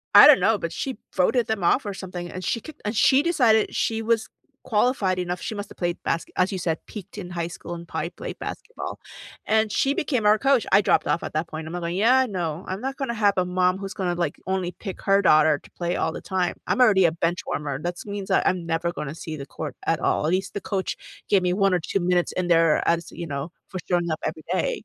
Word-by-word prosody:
I - - +12
don't 295 -3 +8
know, 220 -1 +3
but 170 -2 -4
she 265 +2 -4 0.2
voted 225 +6 +2
them 220 -3 -1
off 230 +8 +3
or 200 - -3
something, 180 -2 -7
and 185 0 -6
she 230 - -1
kicked 315 - -12
and 210 +2 -2
she 265 +6 +5
decided 245 -10 +3
she 225 0 0
was 225 0 0 0.3
qualified 210 -5 +1
enough. 180 0 -3
She - - -4
must've 205 0 -7
played 175 -1 -2
baske 165 - -1
as 185 +2 +2
you - - -2
said, 165 -3 -1
peaked 205 0 -9
in 180 -3 -6
high 170 -1 -2
school 175 - -8
and 170 0 -9
probably - - -4
played - - -8
basketball, - - -6 0.5
and 220 0 +2
she 275 +1 +2
became 255 -8 -1
our 210 +1 +6
coach- 270 -2 +3
I 195 - +7
dropped 205 - +2
off - - 0
at - - -6
that 160 +2 -2
point- 160 0 -6
Imma, 175 +2 -5
li 170 +1 -3
"Yeah, 255 +4 +5
no," 170 -3 -3
I'm 190 +2 -4
not 270 +2 -3
gonna 270 -4 -3
have 205 -3 +3
a 185 - +3
mom 180 0 +1
who's 195 0 -6
gonna, 180 -4 -1
like, 175 0 -2
only 190 -2 -1
pick 190 -1 -8
her 200 0 +3
daughter 155 -4 +5
to - - -17
play 175 0 -2
all - - 0
the - - -6
time, 185 -2 -1
I'm - - 0
already 195 -4 +5
a 165 - +4
benchwarmer, 150 -4 -2
that’s 175 +2 -4
means 200 -1 -5
that 190 - +3
I'm 180 -2 0
never 170 +1 0
gonna 150 +1 -4
see 160 -1 -5
the 140 -2 -7
court 155 -3 -5
at 165 - +1
all, - - +1
at 160 - +1
least 190 - -6
the 200 - -4
coach 190 -1 0 0.4
gave 195 -2 +4
me - - +2
1 195 - +3
or 180 - +3
2 195 - +1
minutes 175 -1 +2
in 185 - 0
there 165 -1 +5
are - - -2
as, 170 0 -4
you 170 - -4
know, 140 -2 -3 0.3
for 185 - -5
showing 175 -2 +1
up 155 - -4
every 160 - -10
day - - +1
185 Hz, 250 wpm, -24 LUFS, 170-215 Hz, 0.5 s, I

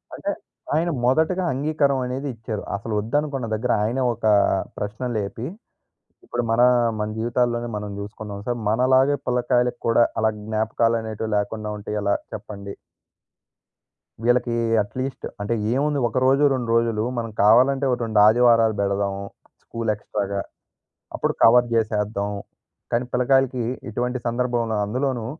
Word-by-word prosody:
అంటే - - -3 0.4
ఆయన 165 +2 +1 0.2
మొదటగా 160 +8 +2
అంగీకారం 140 0 +1
అనేది 130 +3 -4
ఇచ్చారు. 110 -2 -5
అసలు 110 +2 -5
వద్దనుకున్న 135 +4 -1
దగ్గర 120 +3 -1
ఆయనే 120 +5 0
ఒక 115 0 -7 0.5
ప్రశ్న 105 +4 -5
లేపి 105 +3 -4 0.8
ఇప్పుడు 120 - -2
మన 115 +2 +3 0.4
మన 105 0 -1
జీవితాల్లోనే 120 +1 0
మనం 105 0 -5
చూసుకున్నాం 105 0 -7
సార్, 120 -1 -1
మనలాగే 130 +5 +3
పిల్లకాయలకి 125 0 +1
కూడా 115 0 +4 0.2
అలా 110 0 +3
జ్ఞాపకాలు 110 +1 +1
అనేటివి 110 0 -5
లేకుండా 105 +1 -2
ఉంటే 105 - -8
ఎలా 100 0 +2 0.2
చెప్పండి. 100 -1 -8 1.5
వీళ్ళకి 120 0 +2 0.3
అట్లీస్ట్ 130 +5 -5 0.2
అంటే 105 +3 -1 0.2
ఏముంది, 145 +2 +1
ఒక 115 - -4
రోజు, 135 +2 +4
2 125 -3 -3
రోజులు 115 -2 +1
మనం 115 -1 -3
కావాలంటే 130 +6 +5
ఒక 125 - +1
2 110 -2 +1
ఆదివారాలు 115 -1 +4
పెడదాము 100 0 -1 0.4
స్కూల్ 115 -1 -4
ఎక్స్ట్రాగా. 100 -2 -3 0.7
అప్పుడు - - 0
కవర్ 120 +1 +6
చేసేద్దాం 105 -2 0 0.6
కానీ 120 +1 +1
పిల్లకాయలకి 130 0 +2 0.3
ఇటువంటి 125 +3 -2
సందర్భంలో, 120 -2 0
అందులోనూ 125 +1 -2
115 Hz, 130 wpm, -23 LUFS, 110-125 Hz, 1.5 s, కవర్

